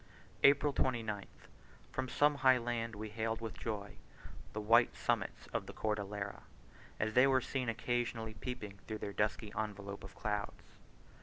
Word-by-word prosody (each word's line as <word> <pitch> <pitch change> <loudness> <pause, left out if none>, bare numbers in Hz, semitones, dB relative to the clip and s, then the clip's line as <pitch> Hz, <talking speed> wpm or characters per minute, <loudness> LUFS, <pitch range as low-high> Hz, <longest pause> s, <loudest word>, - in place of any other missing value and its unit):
April 140 +1 +6
29th. 110 -7 0 0.6
From 130 -1 -2
some 145 +2 +4
high 130 -1 +7
land 115 -2 -2
we 110 +1 -5
hailed 110 +1 -1
with 115 -1 -4
joy 100 -3 -4 0.5
the 110 - -3
white 115 +3 +5
summits - - -1
of - - -1
the - - -7
Cordillera, 100 -1 -2 0.6
as 110 +1 0
they 125 +3 +7
were 135 -1 +5
seen 130 -1 -2
occasionally 115 -1 -1
peeping 105 -5 -6
through 110 - -3
their 100 -1 -5
dusky 105 +1 0
envelope 100 -2 -4
of 95 0 -10
clouds. 105 -2 -2
110 Hz, 150 wpm, -35 LUFS, 105-120 Hz, 0.6 s, high